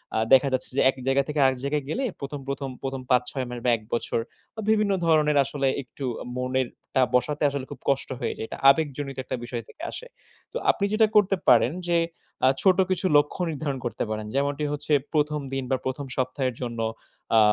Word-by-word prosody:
আ - - +2 0.2
দেখা 135 +1 +7
যাচ্ছে 130 - -1
যে - - +5
এক 135 - -1
জায়গা 135 +1 +3
থেকে 150 0 -2
আরেক 130 -1 +3
জায়গায় 145 0 0
গেলে 260 - -1 0.2
প্রথম, 140 +1 -5
প্রথম, 140 0 -3
১ম 135 -1 -3
৫ 125 -1 +4
৬ 130 -2 -2
মাস 120 -1 -5
বা 125 - +4
১ 110 - -16
বছর 115 - 0 0.4
বা 220 - -5
বিভিন্ন 210 -2 +3
ধরণের 150 -2 +4
আসলে 140 -2 -1 0.2
একটু 130 +3 -8 0.3
মনেরটা 130 0 -1
বসাতে 135 +5 +1
আসলে 140 -2 -4
খুব - - -8
কষ্ট 135 -1 0
হয়ে 120 - -1
যায়। 110 - -4
এটা - - -6
আবেগজনিত 140 -2 +1
একটা - - -3
বিষয় 120 -1 -4
থেকে 310 - -15
আসে। - - -8 0.4
তো - - -3
আপনি 200 - -1
যেটা 220 0 +5
করতে 200 -2 +5
পারেন 120 +2 +6 0.2
যে, 170 -1 +3 0.5
আ - - +7
ছোট 185 -2 +5
কিছু 185 0 0
লক্ষ্য 150 +5 +1
নির্ধারণ 145 -2 -3
করতে 120 - -2
পারেন। 110 0 -3
যেমনটি 140 +1 0
হচ্ছে 150 +1 -2 0.2
১ম 150 -1 +1
দিন 135 0 -1
বা 130 - +3
১ম 130 +2 -3
সপ্তাহের 130 0 -1
জন্য 120 -2 -4 0.6
আ - - +8
140 Hz, 200 wpm, -25 LUFS, 130-150 Hz, 0.6 s, আ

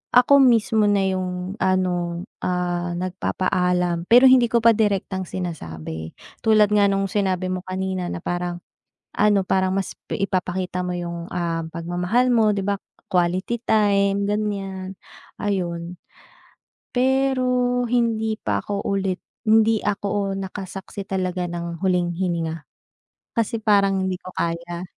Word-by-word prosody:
ako 275 +3 +7
mismo 225 -4 +4
na 200 -1 +3
yung 185 +1 -3
ano, 180 -2 0 0.2
ah, 175 -1 -1
nagpapaalam 180 -1 0
pero 245 +3 +7
hindi 250 -2 +6
ko 235 0 +1
pa 230 - +8
direktang 200 -3 0
sinasabi. 80 - -6 0.2
Tulad 215 -2 +4
nga 205 -1 +4
nung 195 0 0
sinabi 185 -2 0
mo 185 - -2
kanina 185 -1 -3
na 170 - -5
parang 175 0 -3 0.5
ano, 205 -2 +3
parang 190 0 +1
mas 195 - -2 0.2
ipapakita 185 -1 -2
mo 180 - -3
yung, 170 0 -5
um, 170 -2 -2
pagmamahal 180 +9 0
mo, 220 -2 +4
'di 200 -2 -1
ba, 200 -1 -1 0.2
quality 185 +5 0
time 200 -2 +2
ganyan, 195 -2 -3 0.4
ayun. 175 -3 -3 0.9
Pero 250 -1 +1
hindi 225 -2 +1
pa 100 - -1
ako 200 - -4
ulit 195 -2 -1 0.2
hindi 220 0 +4
ako 200 -1 -1
nakasaksi 195 0 -6
talaga 185 -2 -1
ng 170 0 -5
huling 180 -2 +1
hininga 165 -3 -2 0.8
kasi 230 0 0
parang 200 -2 +3
hindi 185 -1 -1
ko - - -14
kaya. 170 +1 -3
190 Hz, 125 wpm, -23 LUFS, 180-210 Hz, 0.9 s, pa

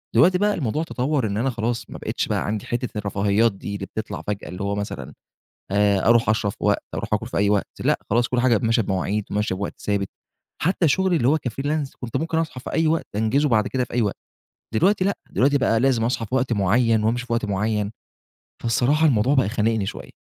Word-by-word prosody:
دلوقتي 180 +1 +6
بقى 205 +1 +2
الموضوع 150 +1 -1
تطور، 135 -5 -1
إن 100 +1 -2
أنا 130 +4 +1
خلاص 115 0 -3
ما - - -7
بقِتش - - -2
بقى - - -1
عندي 105 -1 -3
حتة 120 -2 -3
الرفاهيات 105 +2 +2
دي، 100 +1 -6
اللي 100 - -5
بتطلع 110 +2 -5
فجأة، 105 -3 -3
اللي 90 +3 -5
هو 100 0 -1
مثلًا 100 -10 -5 0.6
آآ 100 0 +3
أروح 115 -1 +4
أشرب 105 -2 +1
في - - -17
وقت، - - +2
أروح - - -2
آكل - - -2
في - - -6
أي 100 0 +3
وقت، 105 -1 +1
لأ - - +2
خلاص، 120 +2 +2
كل 125 -1 +1
حاجة 120 -3 +4
ب 105 - -2
ماشية 115 0 +3
بمواعيد، 100 +2 -1
وماشية 105 -2 0
بوقت 100 +2 -5
ثابت، 100 -2 -1 0.5
حتى 175 -1 +2
شغلي 185 +4 +2
اللي 125 -3 +2
هو 155 - +4
كfreelance، 145 +3 -2
كنت 120 -3 -4
ممكن 160 0 -1
أصحى 155 -6 -3
في - - -7
أي 160 0 +2
وقت، 160 +1 +1
أنجزه 135 +7 +2
بعد 110 -3 +2
كده 130 -1 0
في - - -16
أي 120 - +2
وقت، 100 - -1 0.6
دلوقتي 190 - +3
لأ، 200 - 0
دلوقتي 140 +3 +3
بقى 115 -4 +2
لازم 125 -3 +2
أصحى 115 -2 -1
في 125 - -3
وقت 125 -2 +1
معين، 110 +2 +2
وأمشي 120 +3 0
في 120 - -2
وقت 115 -2 0
معين، 105 +1 -1 0.7
فالصراحة 135 +7 +2
الموضوع 125 +2 +3
بقى 115 -7 +3
خانقني 110 -2 0
شوية. - - -7
115 Hz, 220 wpm, -23 LUFS, 105-135 Hz, 0.7 s, دلوقتي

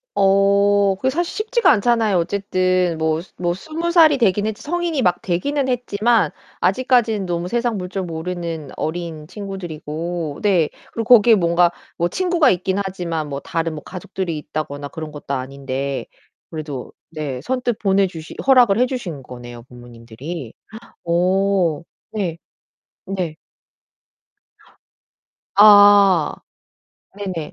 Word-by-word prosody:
어 200 0 +3
그게 260 +7 0
사실 340 +5 -2
쉽지가 475 +1 +3
않잖아요. 225 -2 +2
어쨌든 185 -1 0
뭐, 160 0 0 0.2
뭐 175 -1 -1
20 320 - -4
살이 315 -5 +6
되긴 205 -3 +2
했지 220 -1 -4
성인이 340 -1 -1
막 180 -4 +2
되기는 270 +10 -1
했지만 240 -2 +1 0.3
아직까지는 235 -6 +2
너무 175 0 -2
세상 235 -1 -1
물정 185 0 -4
모르는 165 -2 -5
어린 160 -2 -4
친구들이고 170 -5 -5
네. 180 -7 +2 0.2
그리고 230 +2 +4
거기에 225 +1 +5
뭔가 170 -1 +3 0.3
뭐 170 0 0
친구가 345 - +2
있긴 185 +1 0
하지만 170 -5 -4
뭐 140 -1 -4
다른 165 -1 -3
뭐 150 - -8
가족들이 180 -2 -5
있다거나 145 -1 -5
그런 155 0 -7
것도 145 -1 -5
아닌데 135 +1 -4 0.4
그래도 150 -5 -6 0.2
네 150 -5 -5
선뜻 250 - -2
보내 195 -1 +2
주시 165 -3 -9
허락을 245 -6 +5
해 250 - +4
주신 190 - -5
거네요 120 -2 -10
부모님들이. 120 +3 -9 0.5
어 180 -1 +1 0.3
네. 180 -6 -3 0.7
네. 180 -5 -3 2.2
아 205 -4 +7 0.8
네네. 185 -7 -5
185 Hz, 265 characters per minute, -20 LUFS, 160-210 Hz, 2.2 s, 아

